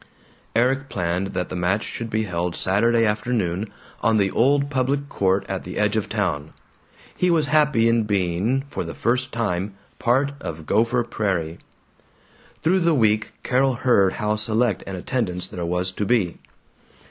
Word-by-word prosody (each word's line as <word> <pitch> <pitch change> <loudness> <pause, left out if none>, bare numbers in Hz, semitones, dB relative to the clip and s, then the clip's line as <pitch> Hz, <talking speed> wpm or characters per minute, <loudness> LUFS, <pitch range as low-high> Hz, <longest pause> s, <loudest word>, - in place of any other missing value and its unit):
Erik 135 +4 +2
planned 90 +1 -1
that 90 -1 -2
the - - -5
match 90 +4 0
should 115 -1 -5
be 110 0 0
held 90 -3 -2
Saturday 115 +5 +2
afternoon, 105 -3 -1 0.3
on 115 -1 +3
the 100 -2 +2
old 140 +3 +2
public 135 +1 0
court 95 -4 +1
at 95 -1 -3
the 90 - -7
edge 105 0 +1
of 105 -2 -1
town. 90 -9 -2 0.6
He 180 - +1
was 165 -3 +3
happy 150 -7 +4
in 115 -1 +2
being, 100 +6 0
for - - -4
the - - -7
first 125 +2 0
time, 100 -4 -2 0.2
part 135 +4 +2
of 80 -1 -6
Gopher 115 +7 +2
Prairie. 90 -8 -2 1.0
Through 180 +4 +3
the 170 -2 +3
week 110 -4 +2
Carol 130 0 +2
heard 100 -7 +3
how 105 0 -1
select 110 0 0
an 95 - -4
attendance 90 -3 -1
there 90 - -6
was 90 +1 -1
to 100 - -3
be. 100 -8 +1
110 Hz, 160 wpm, -23 LUFS, 95-125 Hz, 1.0 s, happy